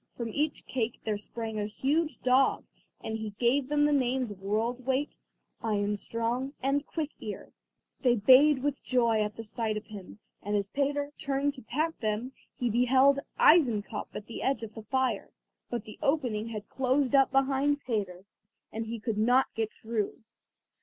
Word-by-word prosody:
From 235 -2 -3
each 295 +6 -1
cake 235 -2 -2
there 210 -2 -1
sprang 220 +1 -5
a 205 - -1
huge 300 +9 0
dog, 255 +1 +3 0.4
and 220 0 -3
he 215 -2 -6
gave 255 +3 +2
them 295 0 +3
the 295 - +3
names 255 -3 +1
of 195 -2 -10
World's 225 +5 -1
weight, 265 +3 -1 0.5
Ironstrong, 230 +5 -1
and 280 +2 0
Quick 310 -2 -3
ear. - - -7 0.5
They 245 -3 +4
bayed 260 +5 +6
with 290 -1 -1
joy 235 -4 +2
at 210 0 -2
the 225 - -7
sight 220 0 -2
of 215 - -6
him, 205 -2 -10 0.2
and 205 +1 -2
as 200 -1 0
Peter 285 +2 -1
turned 280 +1 0
to 260 - -10
pat 310 +8 -2
them, 220 +3 -2 0.2
he 245 - -1
beheld 260 +4 +4 0.2
Eisenkopf 235 -10 +4
at 205 - -6
the 230 - -7
edge 265 -4 0
of 220 -1 -7
the 220 - -8
fire, 245 -1 -1 0.4
but 240 -3 -3
the 215 - -12
opening 245 -7 0
had 215 -2 -6
closed 265 +1 +1
up 270 -1 +5
behind 275 +2 +2
Peter, 200 -7 -3 0.5
and 225 0 -4
he 230 +1 -4
could 220 -1 -2
not 245 +4 +3
get 220 -1 -2
through. 220 -2 -3
240 Hz, 175 wpm, -29 LUFS, 215-275 Hz, 0.5 s, bayed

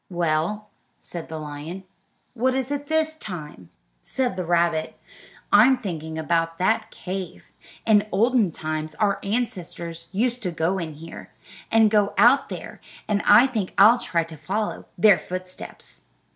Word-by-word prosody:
"Well," 175 +4 -1 0.3
said 170 -2 -8
the 160 - -6
lion, 155 +5 -7 0.5
"what 255 +2 +1
is 265 +1 -2
it 285 0 -3
this 315 0 +1
time?" 150 - -8 0.3
Said 250 - -2
the 185 - -3
rabbit: 170 -2 0 0.6
"I'm 245 +6 +7
thinking 160 -8 -5
about 165 +1 0
that 220 +4 +1
cave. 185 -2 -7 0.3
In 210 -2 +4
olden 230 0 +3
times 155 -1 -4
our 200 +1 +1
ancestors 175 -6 -3
used 240 +5 0
to 185 - -1
go 170 +3 -1
in 160 -3 -5
here, 165 +2 -10 0.4
and 225 -2 +5
go 205 -2 +2
out 265 +4 +5
there, - - -8 0.3
and 205 -1 +1
I 215 +5 +8
think 220 -8 -3
I'll 225 +5 +7
try 170 -6 0
and 160 -2 -11
follow 205 +7 -2
in - - -15
their 205 +3 +6
footsteps." 185 0 -7
190 Hz, 150 wpm, -24 LUFS, 165-225 Hz, 0.6 s, I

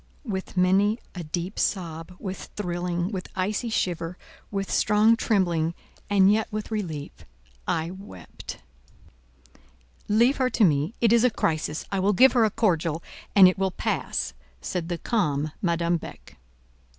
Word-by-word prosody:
With 190 -4 -5
many 195 +4 +3 0.2
a 180 - -6
deep 175 +5 -4
sob, 170 -2 -2
with 190 -2 -6
thrilling, 175 -1 -2
with 185 -3 -5
icy 205 +5 -1
shiver, 175 -4 -2 0.3
with 195 -1 -3
strong 210 +2 +4
trembling, 170 -7 +1 0.3
and 200 0 +5
yet 220 +1 +1
with 215 +1 -4
relief—I 150 - -5
wept. 185 - -10 1.5
"Leave 235 +6 +4
her 255 -1 +2
to 235 - +2
me; 155 - +2
it 230 -1 +5
is 235 0 +5
a 250 - +5
crisis: 155 -7 -1
I 195 - 0
will 200 +2 +2
give 260 +6 +7
her 235 -3 +4
a - - +2
cordial, 165 -6 0 0.3
and 195 -2 +9
it 185 +1 +1
will 195 0 +2
pass," 180 - -2 0.3
said 170 - -4
the 175 - -2
calm 155 -9 0
Madame 170 -1 +1
Beck. - - -11
185 Hz, 145 wpm, -25 LUFS, 165-210 Hz, 1.5 s, and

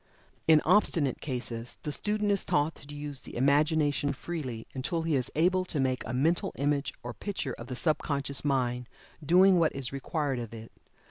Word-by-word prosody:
In 155 -1 +6
obstinate 165 - +3
cases, 120 -3 -4
the 150 - -2
student 210 +5 0
is 200 - +2
taught 150 +2 +1
to 145 +1 -11
use 145 -2 -4
the - - -10
Imagination 145 +2 +2
freely, 130 -8 -5
until 160 +5 -2
he 165 -2 +1
is 125 -3 -1
able 185 +4 +3
to 155 - -3
make 130 -1 +1
a - - -3
mental 165 +9 +1
image 145 0 0
or 120 0 -5
picture 185 - -4
of 115 - -9
the 125 - -5
sub 155 +4 +1
conscious 140 -1 -2
mind 125 -4 0 0.3
doing 180 +4 +6
what 160 -4 +2
is 135 -1 -4
required 140 -1 -2
of 115 -1 -6
it. 115 0 -10
145 Hz, 185 wpm, -29 LUFS, 130-160 Hz, 0.3 s, In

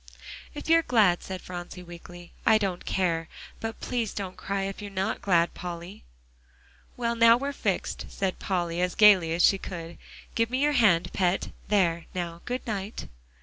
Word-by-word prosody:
"If 295 - -7
you're 330 0 +6
glad," 210 - +3
said 185 -1 -7
Phronsie 180 0 -7
weakly, 175 0 -12
"I 220 - +6
don't 195 -4 -2
care. 165 -3 0 0.3
But 225 -1 -5
please 235 -4 -2
don't 190 -2 -4
cry 195 0 -3
if 195 +1 -5
you 205 - -5
are - - -10
not 190 0 -2
glad, 170 -3 +2
Polly." 175 +1 -7 0.9
"Well, 235 -1 0
now 230 0 +7
we're 275 +3 -3
fixed," - - -2
said 190 -2 -2
Polly 175 -2 -1
as 180 0 0
gaily 195 -6 +6
as 170 +2 +1
she 195 - +4
could. 170 -3 -7 0.3
"Give 230 0 +1
me 255 - -1
your 295 - +3
hand, 215 - +3
Pet. 185 0 0 0.2
There, 170 -5 +1
now, 170 -1 -4
good 250 +1 -3
night." 205 -1 -4
190 Hz, 175 wpm, -27 LUFS, 175-220 Hz, 0.9 s, now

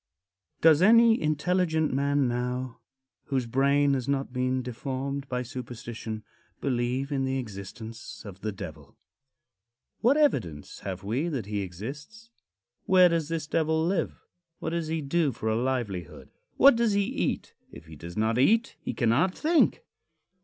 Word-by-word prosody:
VI. 90 0 -60
Does 160 -1 +6
any 230 +3 +6
intelligent 160 0 +1
man 140 0 +2
now, 125 0 -3 0.5
whose 130 -3 -1
brain 140 +3 +3
has 130 -3 -1
not 135 -2 -1
been 130 0 0
deformed 135 +3 -4
by 125 0 -1
superstition, 120 -3 -7 0.4
believe 130 +1 -1
in 135 -2 0
the 130 0 0
existence 110 0 -8
of 100 -1 -10
the 110 - -2
Devil? 80 -7 -9 1.0
What 255 +6 +4
evidence 85 - 0
have 95 -1 -6
we 120 - -1
that 135 - -3
he 105 0 -3
exists? 145 - -8 0.5
Where 185 -1 +6
does 165 -2 -1
this 165 -2 -2
Devil 160 +1 +1
live? 180 -1 -1 0.4
What - - -4
does 170 -1 -2
he 160 0 -1
do 150 +1 +1
for 110 -2 -3
a 110 - +1
livelihood? 115 - -3 0.3
What 275 -2 +8
does 230 -2 +2
he 200 0 +3
eat? 245 +7 -2 0.2
If - - -12
he 80 -1 -12
does 85 +5 -9
not 110 +2 +1
eat, 225 - +3
he - - -4
cannot 135 +10 +2
think. 330 +9 +3
135 Hz, 155 wpm, -27 LUFS, 115-160 Hz, 1.0 s, What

